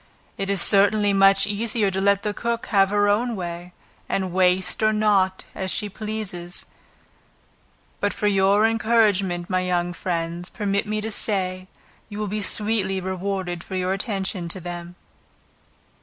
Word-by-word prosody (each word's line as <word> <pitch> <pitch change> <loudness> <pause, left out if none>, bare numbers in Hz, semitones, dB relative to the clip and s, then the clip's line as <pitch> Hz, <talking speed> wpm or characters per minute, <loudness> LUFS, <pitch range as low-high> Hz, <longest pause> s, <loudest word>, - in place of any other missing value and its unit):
It 195 0 -4
is 200 -3 +3
certainly 205 0 +5
much 195 0 +5
easier 210 0 0
to 190 0 -2
let 200 0 +2
the 210 - -1
cook 235 +3 -3
have 195 -1 +5
her 205 0 +2
own 230 +4 +1
way, 175 -1 -6 0.4
and 190 -2 -2
waste 185 +1 +2
or 215 0 +4
not, 205 -3 +2
as 190 -1 -4
she 210 +1 -2
pleases; 200 -4 -4 1.3
but 205 - 0
for - - -4
your 200 +1 +3
encouragement 210 -6 +2
my 185 -2 0
young 175 -1 -1
friends, 170 0 -3
permit 200 -1 -2
me 215 0 -2
to 220 +1 -4
say, 185 -3 -1 0.4
you 205 - -8
will 210 0 -2
be 210 +2 -3
sweetly 200 0 +1
rewarded 185 -1 -3
for 190 - -7
your 185 0 0
attention 195 -3 -3
to 185 - -5
them. 175 0 -7
195 Hz, 155 wpm, -23 LUFS, 185-210 Hz, 1.3 s, certainly